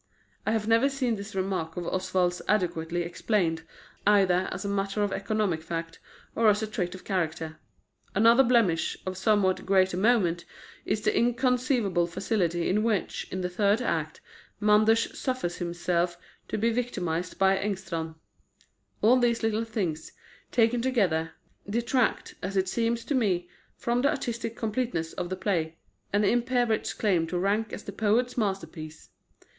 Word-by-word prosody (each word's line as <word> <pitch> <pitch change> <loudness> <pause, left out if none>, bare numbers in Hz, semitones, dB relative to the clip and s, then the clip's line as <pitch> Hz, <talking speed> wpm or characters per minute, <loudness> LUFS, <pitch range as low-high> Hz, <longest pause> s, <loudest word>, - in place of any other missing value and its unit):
I - - +3
have 220 -1 0
never 230 +5 +4
seen 260 -4 -1
this 200 0 -8
remark 185 -4 -2
of 175 - -3
Oswald's 180 0 0
adequately 175 -4 0
explained, 170 -1 0 0.5
either 190 -3 +4
as 190 +3 -5
a - - -1
matter 200 +1 -1
of 200 -1 -1
economic 195 -5 -1
fact, 165 0 -5 0.4
or 225 -1 +4
as 210 +1 +2
a - - +1
trait 185 -4 -3
of 185 - -11
character. 160 -4 -2 0.6
Another 230 +5 +6
blemish, 230 -10 +2
of 185 0 -3
somewhat 190 -1 +2
greater 190 -2 +3
moment, 185 -5 +2 0.4
is 215 - 0
the - - +1
inconceivable 245 - +2
facility 175 -2 -1
with 210 +2 +2
which, 220 -4 -1
in 185 - -3
the 180 - 0
third 200 +4 +2
act, 160 -10 -2 0.4
Manders 215 +2 +3
suffers 255 -10 -2
himself 175 0 -1 0.3
to - - -2
be 230 +2 +2
victimised 180 -8 -2
by 195 0 +4
Engstrand. 185 -5 -3 0.9
All 245 +4 +6
these 235 -1 +1
little 225 0 +1
things, 185 -9 -3 0.4
taken 235 0 +3
together, 185 -11 +1 0.4
detract, 235 +3 0
as 195 +2 -3
it 190 0 +2
seems 230 +3 -1
to - - -1
me, 190 -9 +1 0.3
from 240 +1 0
the 280 - +3
artistic 235 -6 -3
completeness 220 -8 -2
of 175 -1 -4
the 185 - -2
play, 165 -4 -1 0.3
and 205 +1 +2
impair 245 +2 +2
its 220 - 0
claim 180 -6 +1
to 175 +2 -2
rank 205 +4 0
as - - -6
the - - -6
poet's 220 +5 +1
masterpiece. 190 -7 -4
200 Hz, 155 wpm, -27 LUFS, 175-230 Hz, 0.9 s, Another